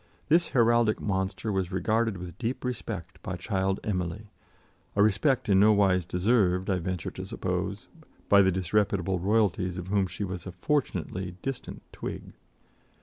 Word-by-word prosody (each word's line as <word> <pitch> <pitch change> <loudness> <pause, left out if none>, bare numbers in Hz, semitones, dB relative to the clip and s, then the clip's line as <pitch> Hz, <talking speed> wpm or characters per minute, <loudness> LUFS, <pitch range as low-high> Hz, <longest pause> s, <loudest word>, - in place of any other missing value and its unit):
This 170 +2 +4
heraldic 115 -3 +3
monster 95 +2 -2
was 95 -2 -1
regarded 110 +2 +1
with 90 -1 -8
deep 120 +2 -3
respect 105 -7 -5
by 95 - -4
child 95 0 -1
Emily, 100 +1 -3 0.6
a 100 - +5
respect 110 +6 +2
in 95 -2 +5
no 105 +2 +6
wise 95 -4 +3
deserved, 95 0 +2
I 95 - +1
venture 90 0 -3
to - - -7
suppose, - - -3 0.4
by 100 -1 +7
the 95 -1 +4
disreputable 95 0 0
royalties 95 -2 +1
of 90 0 -6
whom 100 -1 +2
she 100 - -5
was 95 -2 -5
a - - -5
fortunately 90 - -2
distant 135 -1 -5
twig. - - -7
95 Hz, 150 wpm, -28 LUFS, 90-110 Hz, 0.6 s, by